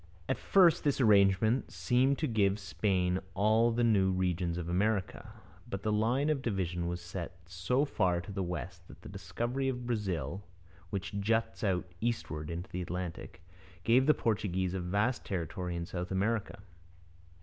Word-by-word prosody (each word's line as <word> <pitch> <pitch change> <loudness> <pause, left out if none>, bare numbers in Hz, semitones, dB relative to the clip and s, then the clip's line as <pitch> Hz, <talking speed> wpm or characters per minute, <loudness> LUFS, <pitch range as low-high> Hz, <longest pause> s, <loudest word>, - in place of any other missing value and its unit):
At - - -1
first 180 -5 +4
this 145 -2 +1
arrangement 105 +1 +4
seemed 130 +2 +2
to 155 - -1
give 100 -3 +2
Spain 90 0 0 0.2
all 110 +4 +4
the 120 +1 0
new 100 -5 +4
regions 90 -2 0
in 85 -1 -4
America, 95 +3 -1 0.4
but 100 0 -4
the 110 - 0
line 120 +8 +2
of 145 -3 -1
division 90 -7 -2
was 85 0 -3
set 85 0 -7
so 95 +11 0
far 90 -11 +1
to 90 - -9
the 100 0 -3
West 85 -6 -5
that - - -15
the - - -9
discovery 130 +3 -2
of 125 -2 -4
Brazil, 95 - -2 0.5
which 100 +2 -4
juts 115 +3 0
out 95 -4 +1 0.2
eastward 110 -10 -2
into 85 +2 -5
the 90 - -3
Atlantic, 90 -1 -6 0.4
gave 125 +4 +4
the 150 - +6
Portuguese 95 -5 -1
a 95 - -2
vast 100 +8 0
territory 90 0 -3
in 85 0 -3
South 90 +1 -5
America. 100 +1 -1
100 Hz, 160 wpm, -31 LUFS, 90-115 Hz, 0.5 s, the